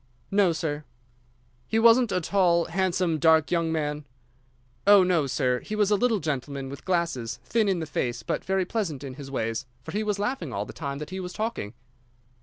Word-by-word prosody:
"No, 195 -3 +4
sir." 155 -2 -3 0.8
"He 220 - 0
wasn't 230 +1 +5
a - - +1
tall, 175 -2 +2
handsome, 180 -2 0
dark 160 0 +4
young 165 -2 +1
man?" 150 -2 -2 0.8
"Oh, 200 -2 +8
no, 175 -6 +2
sir. 125 -1 +1
He 215 - -5
was 210 -1 +2
a - - +6
little 230 0 +2
gentleman, 140 -3 -3
with 140 - -9
glasses, 170 -11 -1
thin 220 -3 +1
in 190 - +1
the 165 - -3
face, 125 -5 -2
but - - -2
very 190 -1 0
pleasant 175 - -3
in 135 -2 -6
his 140 0 -9
ways, 115 0 -2 0.2
for 160 - -7
he 210 +4 -1
was 210 -1 -1
laughing 205 - -2
all 100 -1 -2
the - - -10
time 140 -3 -4
that 150 +4 -7
he 190 - -4
was 180 -1 -6
talking." 215 - -3
170 Hz, 200 wpm, -26 LUFS, 140-195 Hz, 0.8 s, Oh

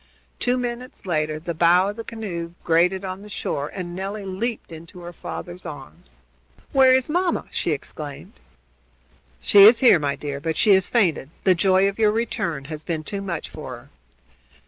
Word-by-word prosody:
Two 250 +1 +1
minutes 250 0 -5
later 155 -3 -1
the 170 +2 -5
bow 175 +4 +4
of 205 - -5
the 230 - -6
canoe 175 -8 -6
grated 180 +4 +2
on 185 +1 -5
the 210 - -12
shore, 145 -6 -3
and 175 -2 -6
Nelly 195 +2 -5
leaped 205 +2 -4
into 165 +3 -11
her 175 0 -8
father's 175 +2 -8
arms. 75 - -11 0.5
"Where 265 -1 +6
is 260 0 +3
mamma?" 350 +2 0
she - - -2
exclaimed. 150 +4 -6 1.1
"She 200 - +6
is 225 +2 +7
here, 240 -9 +7
my 140 -1 -1
dear, 140 -1 -5
but 160 +1 -3
she 205 - +5
has 190 -1 +3
fainted. 175 - +1
The 190 - +5
joy 190 +2 +3
of 200 +2 -4
your 215 -1 +4
return 170 -10 -2
has 155 0 -7
been 160 -2 -3
too 200 +5 -4
much 175 -5 -5
for 130 -5 -7
her." 120 +4 -17
180 Hz, 180 wpm, -23 LUFS, 155-210 Hz, 1.1 s, is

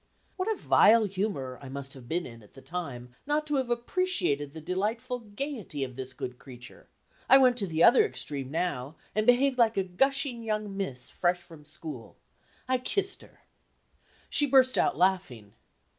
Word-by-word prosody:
What 380 +4 -1
a - - 0
vile 225 +1 +5
humor 185 -10 -3
I 135 - -9
must 135 0 -5
have 125 -3 -12
been 170 +2 -1
in, 115 -2 -11
at 105 - -20
the 135 - -12
time, 135 -9 -6 0.2
not 300 +1 +1
to 295 -2 0
have 260 -2 -1
appreciated 240 - 0
the 160 - -9
delightful 215 - -2
gayety 215 - -5
of 130 -2 -6
this 130 0 -7
good 125 0 -6
creature; 125 -2 -12 0.4
I 270 - +9
went 255 -2 +5
to 200 -5 0
the 160 -1 +1
other 245 - +7
extreme 140 -2 -3
now, 160 -3 -2 0.2
and 215 +1 0
behaved 255 +1 +4
like 230 -2 +4
a 195 - +2
gushing 265 +6 +1
young 215 -3 -3
miss 135 -11 -4
fresh 175 0 0
from 160 -3 -14
school. 155 -5 -9 0.5
I 255 0 +1
kissed 395 +10 0
her. - - -19 0.9
She 290 - +2
burst 260 -1 +5
out - - +2
laughing. 170 - 0
185 Hz, 175 wpm, -28 LUFS, -, 0.9 s, I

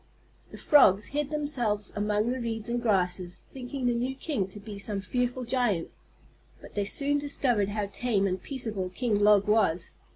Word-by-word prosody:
The - - -10
Frogs 210 -9 +5
hid 295 -1 -1
themselves 250 -9 -1
among 210 +2 0
the 255 - -2
reeds 225 -1 -3
and 240 0 -1
grasses, 180 -5 0
thinking 260 0 -5
the 245 - +3
new 250 +3 -2
king 265 - -2
to 195 +2 -11
be 205 -1 -8
some 200 0 -3
fearful 245 +5 -2
giant. 240 -8 0 0.7
But - - -13
they 205 -1 -1
soon 285 +7 +1
discovered 250 -8 +1
how 205 0 -2
tame 205 0 0
and 185 -1 -1
peaceable 220 -9 -3
King 210 +2 0
Log 205 -1 +5
was. 195 -6 +2
220 Hz, 170 wpm, -28 LUFS, 200-250 Hz, 0.7 s, Frogs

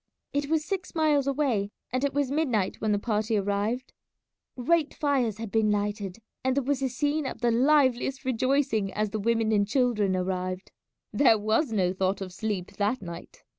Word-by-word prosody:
It 285 0 -1
was 315 -1 +1
six 370 +1 -4
miles 300 -4 +2
away, 260 -8 0 0.2
and 255 +1 0
it 280 - +1
was 285 -1 0
midnight 255 -11 0
when 215 0 +1
the 205 - +3
party 215 +1 0
arrived. 205 +5 -1 0.6
Great 305 +5 +1
fires 260 -8 +1
had 225 -2 -6
been 220 -1 +2
lighted, 205 -2 -1 0.3
and 260 0 +1
there 280 - +1
was 275 +1 0
a 265 - +1
scene 290 +3 -1
of - - -7
the 240 -1 +3
liveliest 265 +1 +2
rejoicing 255 -4 +1
as 210 -1 -1
the 215 - -2
women 225 +1 +1
and 205 -2 +2
children 215 -5 +1
arrived. 185 0 -3 0.4
There 240 -6 +5
was 220 +6 +1
no 185 -4 +1
thought 190 +1 0
of 185 -2 -6
sleep 205 -2 -3
that 210 +5 +1
night. 170 -1 -9
230 Hz, 180 wpm, -27 LUFS, 205-275 Hz, 0.6 s, There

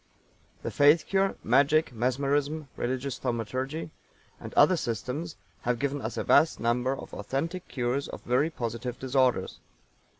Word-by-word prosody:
The - - -3
Faith 145 +3 +5
Cure, 195 0 +1
Magic, 140 +4 +3
Mesmerism, 140 +5 0
Religious 130 +2 -3
Thaumaturgy 130 +6 -3 0.5
and - - -8
other 150 +6 +6
systems 145 +4 -3 0.3
have 120 0 0
given 140 +2 -2
us 110 +1 -4
a - - -1
vast 160 - +4
number 125 +3 +1
of - - -10
authentic 165 - -3
cures 130 +2 -1
of - - -9
very 130 +6 +2
positive 120 -3 -4
disorders. 130 -1 +1
135 Hz, 135 wpm, -28 LUFS, 125-150 Hz, 0.5 s, other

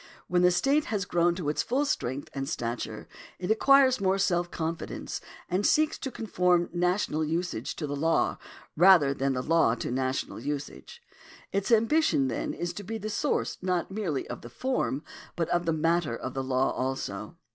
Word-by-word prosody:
When 180 0 +2
the 180 - +6
state 275 +13 +2
has 205 -3 -2
grown 175 -2 +2
to 175 -5 -4
its 150 - +1
full 270 +4 0
strength 135 - -2
and 135 0 -3
stature, 120 -5 -4 0.3
it 180 +3 -2
acquires 260 +1 +5
more 190 0 +2
self 175 -2 +1
confidence, 165 0 -4 0.3
and 185 +3 0
seeks 310 +7 +3
to 265 - -4
conform 180 -7 +1
national 180 -2 +1
usage 160 -6 -2
to 155 - -4
the 145 0 -3
law, 160 +3 +1 0.4
rather 170 -5 +6
than 135 0 0
the 125 -1 -2
law 165 -7 +3
to 120 - -4
national 130 +1 -2
usage. 145 - -6 0.5
Its 200 +3 -1
ambition 230 - +3
is 175 +8 -3
then - - -25
to 205 - -5
be 225 +3 -4
the 215 0 -5
source 290 +7 -1
not 180 -1 -1
merely 190 -9 -2
of 120 - -7
the 120 - -10
form, 170 - -1 0.3
but 165 -2 -1
of 175 0 0
the - - +3
matter 165 -5 +1
of 130 - -5
the 135 - -2
law 130 0 +1
also. 130 +1 -4
175 Hz, 180 wpm, -28 LUFS, 140-200 Hz, 0.5 s, the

